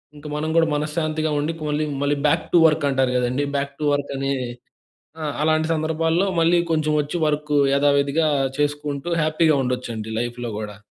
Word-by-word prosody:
ఇంక 145 Hz, 0 st, -14 dB
మనం 155 Hz, +1 st, -2 dB
గూడ 165 Hz, -, +5 dB
మనశ్శాంతిగుండి, 155 Hz, 0 st, -1 dB
పొన్లి 150 Hz, 0 st, -1 dB, 0.2 s
మళ్ళీ 145 Hz, 0 st, +1 dB
బ్యాక్ 145 Hz, -, +1 dB
టు 175 Hz, -, +7 dB
వర్కంటారు 140 Hz, -4 st, +1 dB
కదండీ! 125 Hz, +3 st, 0 dB
బ్యాక్ 140 Hz, 0 st, -2 dB
టు 150 Hz, -, -2 dB
వర్కని 140 Hz, -1 st, -2 dB, 0.9 s
ఆ! -, -, -3 dB, 0.2 s
అలాంటి 155 Hz, 0 st, +2 dB
సందర్భాల్లో 160 Hz, +3 st, 0 dB
మళ్ళీ 170 Hz, +1 st, +4 dB
కొంచెం 155 Hz, -1 st, +1 dB
ఒచ్చి 150 Hz, +4 st, -4 dB
వర్క్ 150 Hz, 0 st, -1 dB, 0.2 s
యథావిధిగా 140 Hz, +2 st, +2 dB, 0.3 s
చేసుకుంటూ 145 Hz, +1 st, -2 dB
హ్యాపీగుండొచ్చండి. 125 Hz, -8 st, 0 dB
లైఫ్‌లో 120 Hz, 0 st, -4 dB
గూడా. 105 Hz, -1 st, -6 dB
150 Hz, 140 wpm, -22 LUFS, 140-155 Hz, 0.9 s, టు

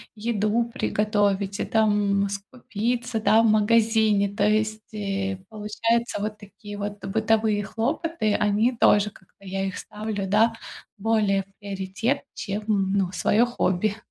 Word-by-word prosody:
еду 215 Hz, +1 st, 0 dB
приготовить, 205 Hz, -1 st, 0 dB
и -, -, -1 dB
там 205 Hz, -2 st, +2 dB
скупиться, 230 Hz, +3 st, -3 dB
да, 220 Hz, +1 st, +4 dB
в -, -, +3 dB
магазине. 215 Hz, -1 st, +3 dB
То 200 Hz, +1 st, +1 dB
есть, 215 Hz, +1 st, 0 dB
э, 195 Hz, -2 st, -2 dB
получаются 225 Hz, +1 st, -1 dB
вот 210 Hz, 0 st, -3 dB
такие 205 Hz, 0 st, -10 dB
бытовые 210 Hz, +1 st, 0 dB
хлопоты, 235 Hz, -, -1 dB
они 210 Hz, +4 st, +2 dB
тоже, 205 Hz, -2 st, +4 dB
как-то 195 Hz, +1 st, -21 dB
я 195 Hz, 0 st, -2 dB
их 190 Hz, 0 st, -4 dB
ставлю, 210 Hz, -1 st, -4 dB
да, 220 Hz, +4 st, +3 dB, 0.4 s
более 205 Hz, -2 st, +1 dB
в 195 Hz, +1 st, -33 dB
приоритет, 200 Hz, +7 st, -2 dB
чем 205 Hz, 0 st, -4 dB, 0.3 s
ну 195 Hz, -3 st, +1 dB
своё 215 Hz, +5 st, +3 dB
хобби. 205 Hz, -4 st, 0 dB
210 Hz, 130 wpm, -25 LUFS, 200-225 Hz, 0.4 s, да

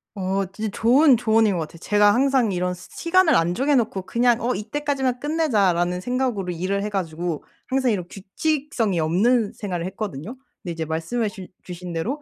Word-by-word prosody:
어 195 Hz, 0 st, -1 dB
진짜 215 Hz, +2 st, -4 dB
좋은 260 Hz, +3 st, +5 dB
조언인 220 Hz, -2 st, +3 dB
것 175 Hz, -, -2 dB
같아요. 155 Hz, +2 st, -7 dB
제가 205 Hz, +3 st, +4 dB
항상 260 Hz, -3 st, +2 dB
이런 180 Hz, 0 st, -1 dB
시 180 Hz, 0 st, -12 dB
시간을 340 Hz, -1 st, +3 dB
안 165 Hz, +1 st, +2 dB
정해 275 Hz, +8 st, +1 dB
놓고 215 Hz, -6 st, 0 dB
그냥 240 Hz, +3 st, +2 dB
'어 245 Hz, +2 st, 0 dB
이때까지만 265 Hz, +3 st, -2 dB
끝내자.'라는 200 Hz, -, +1 dB
생각으로 245 Hz, -5 st, -1 dB
일을 190 Hz, +4 st, -2 dB
해 210 Hz, -, -2 dB
가지고 170 Hz, -4 st, -3 dB, 0.2 s
항상 260 Hz, -2 st, +1 dB
이런 180 Hz, -5 st, -2 dB
규칙성이 225 Hz, -, -1 dB
없는 205 Hz, +8 st, +2 dB
생활을 180 Hz, -5 st, -4 dB
했거든요. 195 Hz, -, -5 dB, 0.3 s
근데 175 Hz, -, -4 dB
이제 165 Hz, 0 st, -4 dB
말씀해 165 Hz, +9 st, -2 dB
주 195 Hz, -3 st, -10 dB, 0.2 s
주신 180 Hz, -1 st, -7 dB
대로 245 Hz, -, -3 dB
210 Hz, 390 characters per minute, -23 LUFS, 180-250 Hz, 0.3 s, 좋은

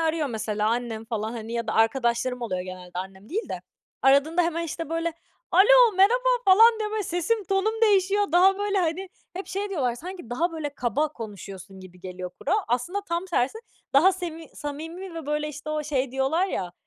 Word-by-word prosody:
arıyor 320 Hz, -1 st, 0 dB
mesela 215 Hz, -2 st, -1 dB
annem 230 Hz, -2 st, -2 dB
falan, 220 Hz, -1 st, -3 dB
hani, 230 Hz, -1 st, -6 dB
ya 235 Hz, -1 st, -2 dB
da 220 Hz, -, -1 dB
arkadaşlarım 240 Hz, +2 st, +1 dB
oluyor 185 Hz, -6 st, -2 dB
genelde, 180 Hz, -1 st, -8 dB
annem 190 Hz, +2 st, -8 dB
değil 435 Hz, +7 st, -3 dB
de. -, -, -5 dB, 0.4 s
Aradığında 285 Hz, +6 st, +4 dB
hemen, 335 Hz, 0 st, -1 dB
işte, 330 Hz, -1 st, -5 dB
böyle, 330 Hz, +1 st, -1 dB, 0.4 s
"Alo, 480 Hz, +4 st, +7 dB
merhaba." -, -, +4 dB, 0.2 s
falan 445 Hz, +4 st, +7 dB
diye, 425 Hz, -1 st, -2 dB
böyle, 430 Hz, -1 st, -1 dB
sesim, 365 Hz, +5 st, -1 dB
tonum 395 Hz, +4 st, 0 dB
değişiyor. 405 Hz, -2 st, +3 dB
Daha 380 Hz, +3 st, +5 dB
böyle, 410 Hz, -1 st, 0 dB
hani 360 Hz, +2 st, -1 dB, 0.2 s
hep 375 Hz, +2 st, -6 dB
şey 400 Hz, +2 st, -3 dB
diyorlar: 260 Hz, -10 st, 0 dB
"Sanki 350 Hz, -2 st, -9 dB
daha, 330 Hz, +7 st, 0 dB
böyle, 310 Hz, -2 st, -3 dB
kaba 250 Hz, +6 st, 0 dB
konuşuyorsun 195 Hz, -, -9 dB
gibi 180 Hz, -1 st, -14 dB
geliyor 185 Hz, -1 st, -7 dB
kulağa." 395 Hz, +7 st, 0 dB
Aslında 250 Hz, +12 st, -1 dB
tam 340 Hz, +2 st, -1 dB
tersi. 350 Hz, -, 0 dB, 0.3 s
Daha 345 Hz, +8 st, +6 dB
semi 330 Hz, -3 st, -6 dB
samimi 325 Hz, +5 st, -6 dB
ve, 325 Hz, -3 st, -7 dB
böyle, 300 Hz, 0 st, -1 dB
işte, 300 Hz, +1 st, -7 dB
o 305 Hz, 0 st, -1 dB
şey 275 Hz, -3 st, -1 dB
diyorlar 270 Hz, +8 st, +1 dB
ya, 180 Hz, -, -3 dB
310 Hz, 185 wpm, -25 LUFS, 235-380 Hz, 0.4 s, Alo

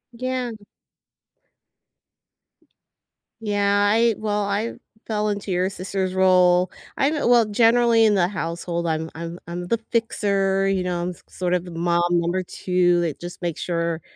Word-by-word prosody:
Yeah. 255 Hz, 0 st, -3 dB, 2.9 s
Yeah, 205 Hz, -1 st, +2 dB
I 230 Hz, +1 st, +3 dB
well, 210 Hz, -1 st, -1 dB
I 200 Hz, +3 st, -2 dB, 0.3 s
fell 215 Hz, -1 st, -1 dB
into 200 Hz, -1 st, -3 dB
your 180 Hz, +1 st, +1 dB
sister's 190 Hz, -1 st, -3 dB
role. 180 Hz, -1 st, +4 dB, 0.3 s
I'm 290 Hz, +3 st, +2 dB
a 295 Hz, -, -1 dB
well, 240 Hz, -2 st, +5 dB
generally 230 Hz, +1 st, +4 dB
in 210 Hz, -1 st, +4 dB
the 175 Hz, -3 st, +3 dB
household, 170 Hz, -2 st, -3 dB
I'm 160 Hz, 0 st, -2 dB
I'm 170 Hz, +1 st, -6 dB
I'm 175 Hz, +1 st, -5 dB
the 230 Hz, -, 0 dB
fixer, 195 Hz, -4 st, +1 dB
you 190 Hz, -2 st, 0 dB
know, 175 Hz, -1 st, -2 dB
I'm 175 Hz, -, -2 dB
s 180 Hz, -, -10 dB
sort 180 Hz, -1 st, -3 dB
of 180 Hz, 0 st, 0 dB
the 175 Hz, -, -9 dB
mom 170 Hz, +1 st, +1 dB
number 175 Hz, +2 st, +1 dB
2 175 Hz, -1 st, +1 dB
that 160 Hz, -4 st, -3 dB
just 175 Hz, 0 st, -9 dB
makes 170 Hz, -3 st, -3 dB
sure 170 Hz, -1 st, -2 dB
185 Hz, 155 wpm, -23 LUFS, 175-210 Hz, 2.9 s, well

